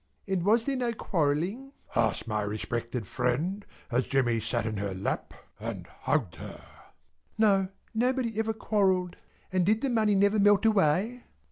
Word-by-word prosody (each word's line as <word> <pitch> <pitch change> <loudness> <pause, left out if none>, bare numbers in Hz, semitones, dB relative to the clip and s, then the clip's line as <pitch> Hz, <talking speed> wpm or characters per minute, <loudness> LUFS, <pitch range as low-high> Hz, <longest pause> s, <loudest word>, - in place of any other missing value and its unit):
"And 190 -3 0
was 225 +4 +3
there 275 - 0
no 245 -2 -1
quarrelling?" 185 - -1 0.2
asked 110 0 +1
my 105 -1 0
respected 115 +3 -3
friend, 140 - -1 0.3
as 125 +2 +1
Jemmy 120 -4 +2
sat 115 0 -2
upon 110 -2 -2
her 100 -2 -3
lap 95 - -3 0.3
and - - -5
hugged 120 - -2
her. - - -8 0.8
"No! 195 -3 +3 0.2
Nobody 240 -1 0
ever 220 0 0
quarrelled." 190 -5 +1 0.4
"And 185 -1 +2
did 215 +5 +2
the 275 - 0
money 215 -3 +3
never 200 +2 +3
melt 205 +1 +5
away?" 215 +4 +2
190 Hz, 150 wpm, -28 LUFS, -, 0.8 s, melt